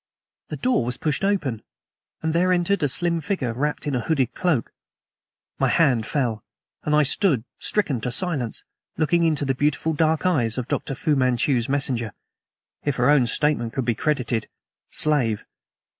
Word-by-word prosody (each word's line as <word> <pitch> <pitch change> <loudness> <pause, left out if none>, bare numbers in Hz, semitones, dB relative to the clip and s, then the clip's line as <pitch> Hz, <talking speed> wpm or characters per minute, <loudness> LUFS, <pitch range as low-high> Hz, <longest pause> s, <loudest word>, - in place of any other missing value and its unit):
The - - -5
door 250 - +1
was 120 +1 -3
pushed 150 +3 -1
open, 155 - 0 0.6
and 160 0 0
there 180 +2 +2
entered 180 +2 +1
a 145 - +3
slim 170 +4 -1
figure 150 - -2
wrapped 150 +6 -2
in 145 - -1
a 125 - 0
hooded 135 -3 0
cloak. 165 - 0 0.9
My - - +3
hand 130 -10 +2
fell, 120 -7 -1 0.4
and 150 - +1
I 150 - +5
stood, 145 - +2 0.2
stricken 145 - 0
to 125 - -2
silence, 140 -6 -1 0.3
looking 170 +2 +2
into 155 -3 +1
the 135 - +1
beautiful 150 +3 0
dark 160 +2 +1
eyes 130 -11 +1
of 125 - -3
Dr. 135 - -2
Fu 150 +2 +1
Manchu's 130 -1 +1
messenger 130 -5 -1 0.7
if 145 -2 0
her 125 +3 +3
own 135 -5 +4
statement 120 -3 0
could 135 -3 -2
be 120 - +2
credited, 120 -5 -1 0.4
slave. 130 -9 +2
145 Hz, 165 wpm, -23 LUFS, 120-160 Hz, 0.9 s, I